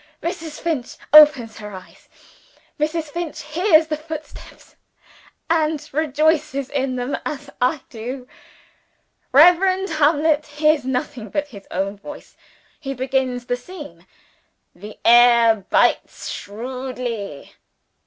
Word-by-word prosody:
Mrs. 330 -3 -5
Finch 310 -8 -3 0.2
opens 295 -8 +7
her 210 -1 -8
eyes; 185 - -14 0.7
Mrs. 310 0 -2
Finch 340 -2 -5
hears 320 +1 +3
the 310 0 -2
footsteps, 310 0 -10 0.7
and 310 -2 0
rejoices 300 -2 0
in 270 -2 -1
them 250 +2 -2
as 290 -1 -6
I 260 +4 +1
do. 250 +3 -7 1.0
Reverend 365 +6 +5
Hamlet 305 0 +2
hears 300 -1 +1
nothing 250 -3 -3
but 295 +6 -2
his 200 -6 -13
own 195 +2 -3
voice. 295 +9 -11 0.4
He 275 -2 -5
begins 260 -1 -1
the 245 - -1
scene: 245 - -11 0.7
"The 210 +4 -11
air 235 -1 +6 0.2
bites - - +1
shrewdly. 240 - -6
280 Hz, 110 wpm, -21 LUFS, 245-310 Hz, 1.0 s, opens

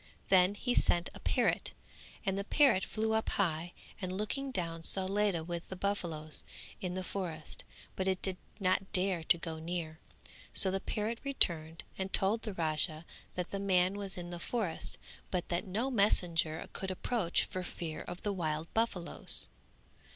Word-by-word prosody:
Then 185 +1 +5
he 245 +4 0
sent 175 -7 +2
a - - -10
parrot - - +1 0.5
and 195 -1 +1
the 200 - -1
parrot 240 -3 +4
flew 220 0 -1
up 220 0 +1
high 170 -3 +1 0.3
and 185 -1 -2
looking 275 +7 -2
down 165 -8 -3
saw 190 +3 +4
Ledha 195 -3 +1
with 170 0 -5
the 190 - -5
buffaloes 170 -6 -1 0.4
in 180 -1 -3
the 185 - -2
forest; 175 -5 -5 0.3
but 190 - -1
it 190 -1 +1
did 190 -2 0 0.2
not 190 0 +1
dare 185 -3 +3
to 170 - +4
go 165 -1 -5
near, 160 -1 -4 0.6
so 190 - +8
the 195 - 0
parrot 220 +4 -2
returned 165 - +4 0.2
and 190 0 -2
told 205 +4 +4
the 215 -3 -4
Raja 155 0 +1 0.3
that 180 -1 -3
the 200 - -2
man 185 -1 +3
was 200 -2 -5
in 175 0 -6
the 175 - -5
forest 195 -4 -3 0.3
but 180 -2 -2
that 175 +4 -1
no 225 +8 -1
messenger 170 -7 +2
could 190 - -2
approach 185 -1 +1
for 185 - -4
fear 165 -3 -5
of 175 - -8
the 205 - 0
wild 160 -3 -2
buffaloes. 220 -6 0
185 Hz, 170 wpm, -33 LUFS, 170-200 Hz, 0.6 s, so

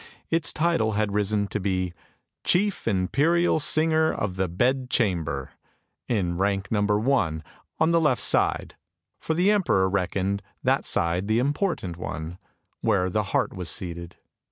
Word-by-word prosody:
Its 165 -1 +1
title 155 -10 +1
had 105 -1 0
risen 105 0 +1
to 105 - -3
be 95 -2 -1 0.3
" - - -55
Chief 200 - +1
Imperial 145 - +2
Singer 160 +1 +3
of 95 -3 -3
the 95 0 0
Bed 125 +9 0
Chamber, 85 - -1 0.3
" - - -51
in 90 -6 -1
rank 100 0 0
number 105 -1 +2
one, 105 - 0 0.3
on 160 +1 +2
the 165 0 +3
left 150 -6 +2
side; - - +1 0.4
for 160 - -2
the 180 +5 +3
emperor 175 - +2
reckoned 100 +1 -1 0.2
that - - +1
side 85 +3 0
the 110 +1 +2
important 140 - -1
one, 85 0 -6 0.4
where 90 0 +1
the 105 +1 0
heart - - 0
was 90 -2 -5
seated. 85 -1 -5
105 Hz, 155 wpm, -25 LUFS, 90-145 Hz, 0.4 s, Singer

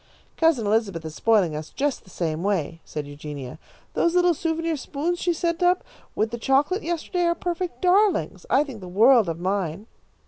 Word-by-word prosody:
"Cousin 320 -9 +2
Elizabeth 205 -6 0
is 160 - -6
spoiling 200 -6 +2
us 155 +1 -6
just 285 0 -2
the - - -18
same 165 -3 -2
way," 170 -5 -1
said 150 -1 -5
Eugenia. 145 -1 -8 0.3
"Those 340 +1 +1
little 355 -1 +4
souvenir 330 +1 -1
spoons 310 +5 -3
she 355 - +1
sent 335 0 -1
up 360 +1 +3 0.3
with 220 +1 0
the 235 - -4
chocolate 280 - +2
yesterday 345 +1 -1
are 340 0 +2
perfect 350 +2 -4
darlings. 390 +3 +2
I 280 - +4
think 260 -8 -9
the 185 - -8
world 220 +2 +5
of 165 0 -4
mine." 185 0 -2
240 Hz, 180 wpm, -24 LUFS, -, 0.3 s, world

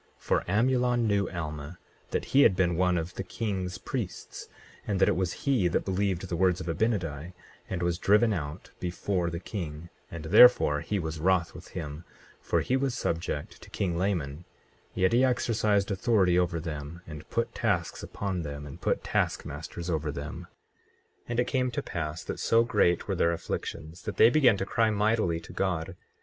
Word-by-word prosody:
24:9 - - -35
For - - 0
Amulon 120 +3 +2
knew 100 -2 +1
Alma, 75 -1 -5 0.3
that - - -2
he 140 - +7
had 100 - +6
been 90 -2 +2
one 90 0 +2
of 85 +1 -3
the 95 - -4
king's 95 -2 -3
priests, - - -5 0.4
and 100 -2 0
that - - +5
it - - +3
was 90 -1 0
he 130 -10 +3
that 85 - 0
believed 95 -1 -1
the 85 - -2
words 90 0 +2
of 90 - -6
Abinadi 85 -4 -1 0.4
and 90 -2 -2
was 85 0 0
driven 105 +3 +4
out 75 -2 -5
before 90 0 -1
the 85 0 -4
king, 85 -4 -6 0.2
and 80 -1 -7
therefore 90 -6 +7
he 100 +6 -2
was 80 -3 -3
wroth 90 0 +2
with 90 +1 -11
him; 75 -1 -5 0.4
for - - +1
he 130 - 0
was 135 -2 0
subject 80 -6 -3
to - - -13
king 90 -4 -1
Laman, 85 -5 -1 0.5
yet 95 +3 +2
he 125 +2 +5
exercised 110 -5 +1
authority 95 -3 +3
over 85 -2 0
them, 80 +1 -6
and 75 -1 -10
put 115 0 -1
tasks 100 -8 -1
upon 95 -3 -3
them, 75 -2 -6
and 70 - -10
put - - 0
task - - 0
masters 85 0 -6
over 80 -3 -1
them. 70 +1 -7 0.8
24:10 - - -22
And 120 0 -1
it - - 0
came 125 0 0
to 120 - -3
pass 85 0 -4
that - - -5
so 115 0 +4
great 90 -7 +2
were - - 0
their 85 - +2
afflictions 85 0 -5
that - - -5
they 115 - +7
began 125 -8 +5
to 95 - -2
cry 115 +2 +2
mightily 105 -5 +1
to - - -12
God. 90 -2 -2
90 Hz, 190 wpm, -28 LUFS, 85-105 Hz, 0.8 s, he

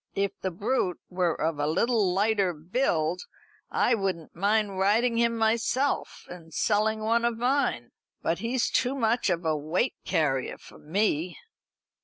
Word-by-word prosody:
If 200 0 0
the 190 - -1
brute 195 0 -1
were 180 -2 0
of 160 -1 -1
a 145 - +1
little 205 +4 +2
lighter 200 -1 +2
build, 170 - -1 0.5
I 245 - +2
wouldn't 190 -7 -2
mind 200 +1 +1
riding 230 +5 +2
him 235 0 +2
myself, 235 +5 0
and 165 -2 -11
selling 215 +4 +1
one 230 +2 +1
of 235 -1 0
mine. 245 - 0 0.3
But 165 - 0
he's 235 +1 0
too 255 +2 +1
much 235 -3 +1
of 175 -1 -1
a 160 -1 +2
weight 160 - 0
carrier 135 -5 0
for - - -15
me." 175 0 -1
200 Hz, 150 wpm, -27 LUFS, 170-230 Hz, 0.5 s, little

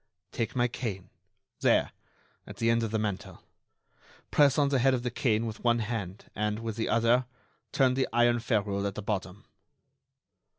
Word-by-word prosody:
"Take 115 +2 -3
my 120 -1 +3
cane, 105 -7 -5 0.5
there, - - +3 0.6
at - - -10
the 115 0 +2
end 115 0 +2
of 115 - -1
the 110 - -1
mantel. 105 -3 -4 0.9
Press 145 -3 +4
on 145 -2 +3
the 135 -2 +2
head 130 +1 +4
of 120 - -4
the 125 - -2
cane 115 -2 +1
with 110 -1 -6
one 120 -1 +3
hand, 105 -4 -4
and, 105 +1 -1
with 115 -1 -4
the 110 - -2
other, 120 +2 +3 0.4
turn 130 -2 +3
the 130 +1 0
iron 120 +1 +3
ferrule 100 -4 0
at 100 - -5
the 105 - -5
bottom." 100 +1 -4
115 Hz, 175 wpm, -29 LUFS, 105-120 Hz, 0.9 s, Press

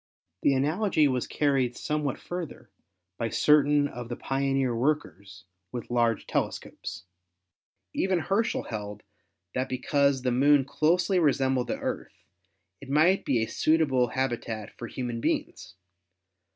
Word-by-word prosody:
The 140 - +3
analogy 155 +3 +2
was 130 -2 -1
carried 135 -4 +1
somewhat 150 -3 -2
further 175 -3 -7 0.5
by 115 - -1
certain 145 +1 +4
of 120 -3 -8
the 120 - -3
pioneer 135 -2 0
workers 100 - -2 0.3
with 120 0 -6
large 120 -2 +1
telescopes. 85 - -4 0.9
Even 190 -1 +1
Herschel 200 +7 0
held 105 -2 -6 0.5
that 130 +1 -1
because 140 +1 +1
the 125 - +1
Moon 140 +2 +4
closely 175 +6 +2
resembled 135 -5 +2
the - - -2
Earth, - - -5 0.6
it 140 - -11
might 160 +7 +3
be 120 -5 +2
a - - 0
suitable 145 -6 +2
habitat 120 -4 -3
for 120 - -7
human 120 -1 -4
beings. 90 -5 -2
135 Hz, 125 wpm, -27 LUFS, 120-150 Hz, 0.9 s, certain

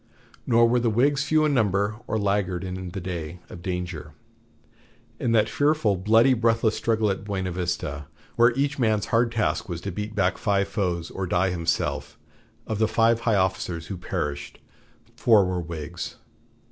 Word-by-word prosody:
Nor 115 0 +5
were 120 +1 +2
the 120 -1 +1
Whigs 135 +5 +2
few 155 -1 +3
in 150 - +2
number 100 -3 +1
or 110 - -1
laggard 100 -3 0
in 95 0 -5
the 95 +3 -5
day 85 -2 -5
of 85 - -10
danger. 90 -5 -5 1.1
In 120 - 0
that 110 -2 +4
fearful, 145 -8 +2
bloody, 110 +7 +4
breathless 115 -2 +2
struggle 110 -2 +1
at 95 - -4
Buena 95 -3 -3
Vista, 80 -5 -3 0.3
where 120 0 +6
each 140 +1 -1
man's 110 -4 +2
hard 115 0 +3
task 115 -1 -1
was 85 -2 -4
to 100 - -4
beat 105 +3 -5
back 95 -2 +1
five 100 -2 +1
foes 90 -5 -2
or 95 -1 -4
die 90 +2 +1
himself, 85 -2 -2 0.5
of 110 -2 -3
the 110 - +3
five 115 +1 +3
high 115 -2 +1
officers 95 -3 -1
who - - -5
perished, 70 -4 -4 0.6
four 110 -5 +5
were 90 -1 -2
Whigs. 85 0 -6
100 Hz, 170 wpm, -25 LUFS, 90-115 Hz, 1.1 s, where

